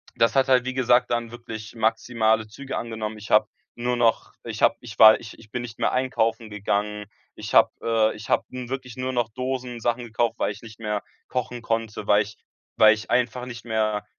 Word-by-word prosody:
das 115 +1 +2
hat 135 0 +4
halt, 125 -1 +4
wie 130 - -2
gesagt, 125 -1 +3
dann 120 -1 -1
wirklich 115 -2 -8
maximale 110 -1 +1
Züge 135 +6 -6
angenommen. 110 -2 -4
Ich 105 - -10
hab 105 0 +5 0.3
nur 120 +1 -1
noch 115 -2 +1
ich - - -6
hab - - +5
ich 115 -4 -10
war 110 0 +9
ich 115 - -11
ich 110 -1 -17
bin 125 - -3
nicht 115 -2 -9
mehr - - +2
einkaufen 115 -3 0
gegangen. 105 +1 -2 0.3
Ich - - -7
hab, - - +7
äh 110 -1 +2
ich 105 +1 -10
hab - - +2
nun 125 -1 -6
wirklich 130 -2 -6
nur 130 0 -2
noch 120 -3 0
Dosen-Sachen 125 -1 -3
gekauft, 115 0 0
weil - - +1
ich 105 - -10
nicht 110 0 -12
mehr 105 -2 -2 0.3
kochen 125 -1 -3
konnte, 115 -2 -3
weil 105 +1 +5
ich 105 +1 -12 0.4
weil 110 0 +8
ich 110 - -10
einfach 125 0 +1
nicht 120 -3 -8
mehr 110 -2 0
115 Hz, 205 wpm, -24 LUFS, 110-125 Hz, 0.4 s, war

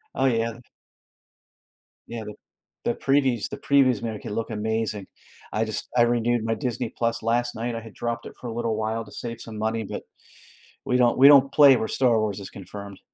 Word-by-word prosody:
Oh, 135 - +1
yeah. 115 -2 0 1.5
Yeah, 115 -2 -5
the 105 - -7 0.5
the - - +1
previews 135 -5 +1
the - - -6
previews, 130 -5 +3
man, 115 -2 -3
it - - -9
can - - -6
look 115 +2 -3
amazing. 110 -2 -2 0.5
I 110 +1 +1
just 110 -1 -5
I 120 - +5
renewed 120 -1 +1
my 115 0 0
Disney+ 120 0 -3 0.3
last 120 +2 0
night, 115 +1 -3
I 115 - -4
had 110 -2 -12
dropped 120 0 -4
it - - -9
for 125 - -7
a 115 - -4
little 115 -1 -1
while 110 +1 -2
to - - -15
save 115 -1 -6
some 110 -2 -8
money, 110 +1 -1
but 100 - -6 0.8
we 125 - +2
don't 120 -1 +3
we 135 - +8
don't 140 -2 +7
play 140 -3 +7
where 110 - -1
Star 120 -4 +2
Wars 105 -2 -1
is 100 0 -8
confirmed. 100 0 -9
115 Hz, 200 wpm, -25 LUFS, 110-120 Hz, 1.5 s, we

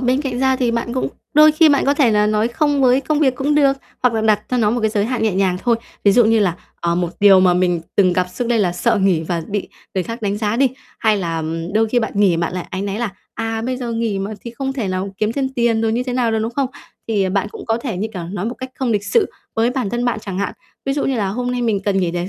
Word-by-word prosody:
bên 255 +2 +1
cạnh 250 -3 -3
ra 265 0 +2
thì 245 -2 +1
bạn 235 +1 -2
cũng 255 - -1 0.3
đôi 305 0 +7
khi 315 +1 +5
bạn 285 -2 +3
có 280 +1 +3
thể 270 -6 +3
là 210 0 +3
nói 215 +2 +1
"không" 285 +2 +1
với 255 +1 +4
công 295 +2 -1
việc 265 -4 +3
cũng 285 +3 0
được 275 -2 +4 0.3
hoặc 245 -2 +3
là 220 - +1
đặt 215 -1 +3
cho 250 - +1
nó 215 -3 +2
một 240 0 -1
cái 220 -1 +1
giới 205 -2 0
hạn 245 0 -2
nhẹ 215 -4 +1
nhàng 190 -2 +1
thôi, 235 -2 +2 0.3
ví 200 - +6
dụ 240 +1 +5
như 225 0 +4
là, 180 -4 +2 0.3
ờ, 170 0 0
một 175 -1 0
điều 195 -2 +7
mà 180 -1 +4
mình 180 -2 +1 0.2
từng 185 -3 +4
gặp 180 0 +1
xước 230 +6 -4
đây 235 -2 +2
là 180 -4 +1
sợ 230 +5 +1
nghỉ 180 -5 +2
và 165 0 -2
bị 205 -1 -3 0.3
người 185 - +1
khác 230 +3 -6
đánh 205 0 -1
giá 215 +1 0
đi, 270 +1 +4 0.3
hay 220 -2 +2
là 165 -4 -2 0.3
đôi 220 0 +3
khi 245 - +2
bạn 220 -2 -2
nghỉ 195 -4 +3
bạn 170 +1 -1
lại 180 - -4
áy 190 0 -3
náy 200 +1 -3
là, 235 -4 -2 0.2
à, 225 0 -3
"bây 255 +2 -2
giờ 245 -2 -4
nghỉ 225 -3 -1
mà, 195 +2 -3
thì 235 - -7
không 270 +3 -3
thể 235 -8 -3
nào 190 +1 -3
kiếm 215 +1 0
thêm 270 +1 -1
tiền" 235 -4 +1
rồi 225 -1 +1
như 245 +2 0
thế 250 - -4
nào 245 -2 +1
đó, 220 - +1
đúng 225 +2 -2
không? 275 +1 0 0.4
Thì 200 -4 +1
bạn 200 +2 0
cũng - - -10
có 225 - +1
thể, 230 -9 -3
như 215 +4 -2
kiểu, 175 - -4
nói 185 +3 -4
một 240 - -3
cách 260 0 -7
không 260 -3 -2
lịch 205 -2 0
sự 430 - +2 0.2
với 230 +2 +2
bản 250 -6 -2
thân 240 0 -1
bạn 245 -2 0
chẳng 195 -2 -5
hạn, 200 - -1 0.3
ví 270 - 0
dụ 285 - -1
như 270 - 0
là 200 -3 0
"Hôm 245 +5 -2
nay 245 -1 -2
mình 220 -4 +1
cần 195 -1 0
nghỉ 175 - 0
để 175 +2 -3
225 Hz, 305 wpm, -19 LUFS, 195-250 Hz, 0.4 s, đôi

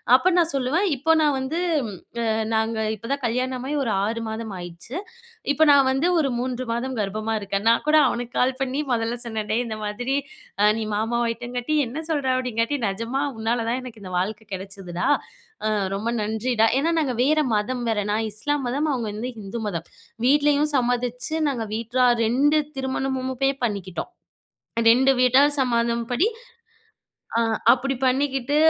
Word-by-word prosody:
அப்போ 345 +8 +4
நான் 335 -1 +3
சொல்லுவேன் 275 +9 +1
இப்போ 295 +5 +1
நான் 295 -2 +3
வந்து 265 +5 -3 0.7
அ - - +2 0.2
நாங்க 220 0 0 0.2
இப்பதான் 270 +6 -4
கல்யாணமாகி 255 +4 -2
ஒரு 225 - 0
6 230 +2 -2
மாதம் 220 -1 -5
ஆயிருச்சு. 175 - -8 0.6
இப்ப 315 - +5
நான் 275 -2 +5
வந்து 270 +5 +1
ஒரு 285 - +1
3 255 0 -2
மாதம் 255 +2 -2
கர்ப்பமா 215 +2 -2
இருக்கேன். 200 0 -3
நான் 230 - +2
கூட 305 - +5
அவனுக்கு 245 0 -4
கால் 255 +1 +1
பண்ணி 265 +2 -1
மொதல்ல 230 0 -1
சொன்னேன். 220 -2 -3
டேய் 240 +3 +1
இந்த 220 -1 -5
மாதிரி, 245 +6 -1 0.6
நீ - - -2
மாமாவ 230 +3 0
ஆயிட்டேங்காட்டி, 245 +5 -2
என்ன 245 +6 -6
சொல்ற? 290 -4 0 0.2
அப்டிங்காட்டி 230 +3 0
நிஜமா 230 +7 -2 0.2
உன்னால 230 +1 0
தான் 240 +2 0
எனக்கு 240 -4 -10
இந்த 185 - -8
வாழ்க்கை 205 +4 -2
கிடச்சதுடா. 190 -2 -5 0.6
அ - - +3 0.3
ரொம்ப 210 +4 -2
நன்றிடா. 220 +2 +1
ஏன்னா 315 +4 +1
நாங்க 270 -5 0
வேற 305 +4 +3 0.2
மதம் 245 +4 -1
வேற. 220 -2 +1
நான் 220 +1 0
இஸ்லாம் 285 +6 -2
மதம், 285 +5 0
அவுங்க 240 -5 -2
வந்து 235 +4 -4
இந்து 200 +4 -5
மதம். 170 -4 -4 0.4
வீட்லயும் 295 +2 +3
சம்மதிச்சு 245 +3 -1
நாங்க 245 -5 -2
வீட்லா 235 +3 +1 0.2
2 285 +7 +3 0.2
திருமணமும்பே 265 0 -1
பண்ணிக்கிட்டோம். 200 - -3 0.8
2 265 +3 +5
வீட்டார் 275 +4 +4
சமாதம் 235 -1 +1
படி 330 - +3 1.1
அ - - +4 0.3
அப்டி 270 +2 0
பண்ணிக்கிட்டு 270 +1 +1
245 Hz, 155 wpm, -24 LUFS, 220-270 Hz, 1.1 s, இப்ப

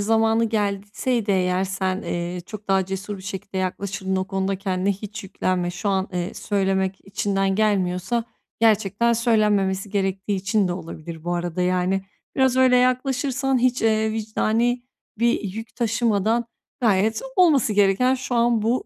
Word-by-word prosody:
zamanı 225 +2 +3
gelseydi 210 +2 -1
eğer 185 -1 +2
sen, 190 +1 -2
eee, 175 +1 -3
çok 215 -1 -9
daha 195 -1 +3
cesur 195 +2 -5
bir - - -11
şekilde 195 0 -6
yaklaşırdın. 190 +1 -2
O 185 0 -1
konuda 195 0 -1
kendine 190 0 0
hiç 210 +2 -8
yüklenme. 185 -1 -1
Şu 175 +3 -3
an, 190 -1 0
eee, 180 -1 -3
söylemek 190 -2 0
içinden 195 -1 0
gelmiyorsa 205 +2 +1 0.4
gerçekten 220 +1 +3
söylenmemesi 210 -4 +1
gerektiği 195 0 -1
için 200 +1 +1
de - - -1
olabilir 165 -2 -8
bu 175 0 -1
arada, 175 0 -2
yani. 185 +1 +1 0.3
Biraz 260 -1 +3
öyle 255 -1 +5
yaklaşırsan, 255 +1 +1
hiç, 250 0 +1
eee, 220 -1 +2
vicdani 225 +2 0 0.4
bir 235 +1 +2
yük 220 +3 -7
taşımadan 230 -1 +1 0.4
gayet 220 -1 +2 0.2
olması 305 -11 +4
gereken 205 +6 +3
şu 255 -1 -4
an 235 -2 +3
bu 235 +4 +1
205 Hz, 145 wpm, -23 LUFS, 190-230 Hz, 0.4 s, öyle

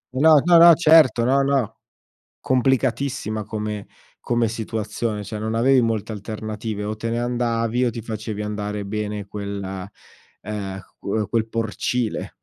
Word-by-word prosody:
No, 155 +2 +6
no, 175 -1 +7
no, 170 -1 +9
certo, 155 -7 +5
no, 135 +3 +3
no. 135 -6 0 0.6
Complicatissima 125 -3 0
come 105 -1 -4 0.3
come 120 -1 +1
situazione, 110 -1 -3
cioè 105 0 -6
non 110 +1 -3
avevi 130 +2 +4
molte 115 -1 -1
alternative 110 0 -5
o 105 +1 -2
te 115 +2 -4
ne 115 - -1
andavi 120 0 0
o - - +1
ti 115 0 -7
facevi 110 -1 -5
andare 105 -1 -4
bene 105 0 -4
quella 100 -1 -6 0.5
ehm, 100 -3 -5 0.2
qu 105 +1 -2
quel 115 0 0
porcile. 115 +1 -2
110 Hz, 140 wpm, -22 LUFS, 105-120 Hz, 0.6 s, no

